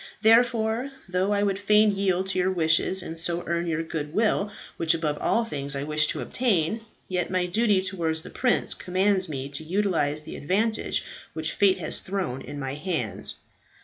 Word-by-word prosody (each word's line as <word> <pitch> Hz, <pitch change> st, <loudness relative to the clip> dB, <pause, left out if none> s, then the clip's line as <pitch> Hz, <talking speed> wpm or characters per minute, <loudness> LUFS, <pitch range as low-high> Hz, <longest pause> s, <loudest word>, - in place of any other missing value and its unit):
Therefore, 230 Hz, +2 st, +3 dB, 0.2 s
though 185 Hz, +2 st, 0 dB
I 205 Hz, 0 st, +2 dB
would 195 Hz, -1 st, 0 dB
fain 210 Hz, +1 st, +4 dB
yield 190 Hz, -2 st, +1 dB
to 185 Hz, -, 0 dB
your 180 Hz, +1 st, +2 dB
wishes 175 Hz, +1 st, +1 dB
and 165 Hz, 0 st, -5 dB
so 170 Hz, +1 st, +1 dB
earn 170 Hz, 0 st, -1 dB
your 165 Hz, 0 st, -1 dB
goodwill, 175 Hz, +7 st, 0 dB, 0.3 s
which 165 Hz, 0 st, +2 dB
above 155 Hz, -3 st, -1 dB
all 230 Hz, 0 st, +1 dB
things 140 Hz, -8 st, -4 dB
I 140 Hz, -, -2 dB
wish 150 Hz, 0 st, +2 dB
to -, -, -3 dB
obtain, 220 Hz, -4 st, 0 dB, 0.3 s
yet 180 Hz, -2 st, -1 dB
my 185 Hz, -1 st, +1 dB
duty 200 Hz, +1 st, +2 dB
towards 165 Hz, -4 st, -2 dB
the -, -, -10 dB
prince 250 Hz, -1 st, +2 dB
commands 185 Hz, 0 st, 0 dB
me 135 Hz, -2 st, -4 dB
to 140 Hz, +2 st, -6 dB
utilize 160 Hz, -5 st, 0 dB
the -, -, -8 dB
advantage 215 Hz, +8 st, 0 dB, 0.3 s
which 160 Hz, 0 st, -2 dB
fate 195 Hz, +1 st, +3 dB
has 160 Hz, -4 st, +1 dB
thrown 185 Hz, -10 st, -3 dB
in 145 Hz, -, -8 dB
my 135 Hz, -1 st, -3 dB
hands." 150 Hz, -, -1 dB
180 Hz, 180 wpm, -26 LUFS, 160-205 Hz, 0.3 s, fain